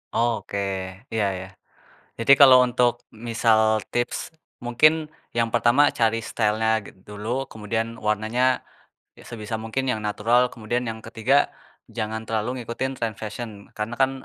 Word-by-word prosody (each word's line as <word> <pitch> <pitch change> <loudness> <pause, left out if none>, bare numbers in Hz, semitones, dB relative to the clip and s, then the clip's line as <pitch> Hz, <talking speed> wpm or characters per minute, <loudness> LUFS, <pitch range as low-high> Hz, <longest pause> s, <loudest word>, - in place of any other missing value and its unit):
Oke, 115 -4 0 0.6
iya 110 -2 +1
iya. 95 - -7 0.7
Jadi 115 +4 +5
kalau 130 -2 +10
untuk 120 0 +2 0.4
misal 115 -1 +3 0.3
tips, 120 0 0 0.5
mungkin 120 +6 +5 0.4
yang 115 -1 +2
pertama 120 +5 +4 0.2
cari 115 0 +2
style-nya 110 0 +1 0.2
git - - -13
dulu, 110 +6 -3
kemudian 110 +1 -2 0.2
warnanya, 110 +4 0 0.8
ya - - -14
sebisa 110 -1 -5
mungkin 130 +4 -2
yang 110 - -3
natural, 115 +4 +2
kemudian 120 +2 -2
yang 110 0 -6
ketiga 115 +4 +1 0.6
jangan 110 +1 -2
terlalu 110 +1 -1 0.2
ngikutin 130 +3 -3
tren 115 -2 -2
fashion. 110 +2 -5 0.3
Karena 105 +2 -3
kan, 135 - +4
115 Hz, 135 wpm, -24 LUFS, 110-120 Hz, 0.8 s, kalau